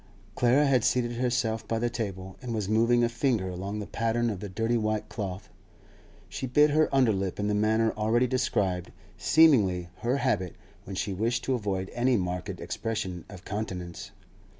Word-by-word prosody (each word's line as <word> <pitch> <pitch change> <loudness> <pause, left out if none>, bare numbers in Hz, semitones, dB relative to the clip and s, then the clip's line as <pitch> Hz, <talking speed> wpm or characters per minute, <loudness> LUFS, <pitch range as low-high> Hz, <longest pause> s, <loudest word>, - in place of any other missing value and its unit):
Clara 125 +6 +3
had 130 -4 +3
seated 120 -2 +1
herself 120 -2 -1
by 115 - 0
the 120 +2 0
table, 95 -5 -5
and 120 -2 -4
was 105 -3 -2
moving 115 +3 +3
a - - +4
finger 115 -5 0
along 95 +3 -4
the 105 - -4
pattern 115 +2 0
of 100 - -5
the 100 - -6
dirty 115 +5 0
white 110 -2 -1
cloth. 100 -2 -5 0.8
She 130 - -5
bit 150 +4 +4
her 155 +1 +3
under 130 -4 +4
lip 95 -1 -3
in 105 - 0
the 105 - +1
manner 110 +2 +2
already 110 +3 +2
described, 100 -8 0 0.2
seemingly 100 - +4
her 120 +6 0
habit 105 -10 0 0.3
when 95 - -6
she 100 +1 -2
wished 115 +5 -1
to 135 - 0
avoid 100 -5 -2
any 125 0 +2
marked 90 -2 -3
expression 95 -6 -4
of 100 -3 -11
countenance. 95 -5 -5
110 Hz, 175 wpm, -28 LUFS, 95-120 Hz, 0.8 s, a